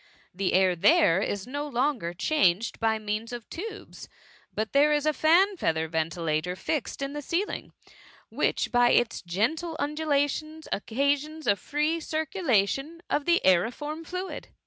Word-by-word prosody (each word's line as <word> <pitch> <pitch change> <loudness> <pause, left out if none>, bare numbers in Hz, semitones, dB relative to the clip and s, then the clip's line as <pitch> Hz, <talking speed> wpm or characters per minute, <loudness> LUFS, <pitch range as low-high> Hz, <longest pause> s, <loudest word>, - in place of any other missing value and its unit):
The 190 +1 -1
air 185 -1 +4
there 165 +1 +4
is 200 -1 -2
no 285 +3 -4
longer 255 - -1
changed 200 - +1
by 225 -1 +1
means 215 +2 -4
of 240 -2 -7
tubes 420 +4 -8 0.2
— - - -29
but 220 +1 -2
there 290 +2 +5
is 295 0 +1
a 305 - +2
fan 360 +7 +4
feather 160 - 0
ventilator 160 +1 -1
fixed 275 +5 -3
in 275 +1 -4
the 295 - -4
ceiling, 345 +8 -3 0.6
which - - 0
by 245 0 +4
its 240 -1 +2
gentle 270 - -1
undulations 300 +1 -1
occa* 275 +7 +1
sions 310 +2 -9
a 205 - +4
free 300 +8 -1
circulation 310 - -1
of 290 - 0
the 345 0 +3
aeriform 245 - +1
fluid. 365 +3 -6
280 Hz, 150 wpm, -27 LUFS, 200-310 Hz, 0.6 s, there